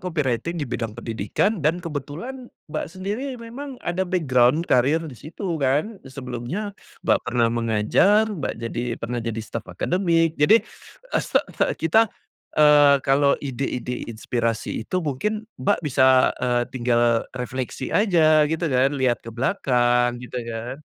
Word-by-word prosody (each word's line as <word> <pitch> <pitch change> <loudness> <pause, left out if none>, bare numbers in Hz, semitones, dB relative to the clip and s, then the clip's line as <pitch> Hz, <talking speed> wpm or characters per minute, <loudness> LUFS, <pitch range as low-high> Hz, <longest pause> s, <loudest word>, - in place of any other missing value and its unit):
copywriting 160 -3 -2
di 150 - -2
bidang 115 -3 -4
pendidikan 165 - -1
dan 165 +5 0
kebetulan 165 - -6 0.2
Mbak - - -2
sendiri 205 +9 -4
memang 250 +4 -8
ada 180 +1 -1
background 150 -3 +3
karir 145 +6 +2
di 155 - -7
situ 155 - -9 0.2
kan. 150 +11 0
Sebelumnya 130 - -5 0.3
Mbak - - +4
pernah 120 -1 +2
mengajar, 115 - +3
Mbak 165 -8 -4
jadi 115 +1 -3
pernah 120 +1 -4
jadi 115 -1 -4
staf 115 +1 -7
akademik 170 -3 +1
jadi, 215 +10 +5 0.5
eee, - - +2
se - - +1
se - - +1
kita, 220 +8 +3 0.5
eee, 145 -2 +6
kalau 140 +1 +3
ide-ide 125 -3 -4
inspirasi 115 0 -2
itu 110 +11 -4
mungkin 210 +10 -2 0.2
Mbak 205 +1 +2
bisa, 130 -2 +4
eee, 125 -1 +1
tinggal 120 -2 +1
refleksi 125 0 -4
aja 155 -7 +4
gitu 160 +2 -2
kan, 135 -1 +2
lihat 130 -3 +1
ke - - -11
belakang 120 - +1
gitu 125 0 -5
kan. 120 +5 -5
140 Hz, 140 wpm, -23 LUFS, 120-175 Hz, 0.5 s, eee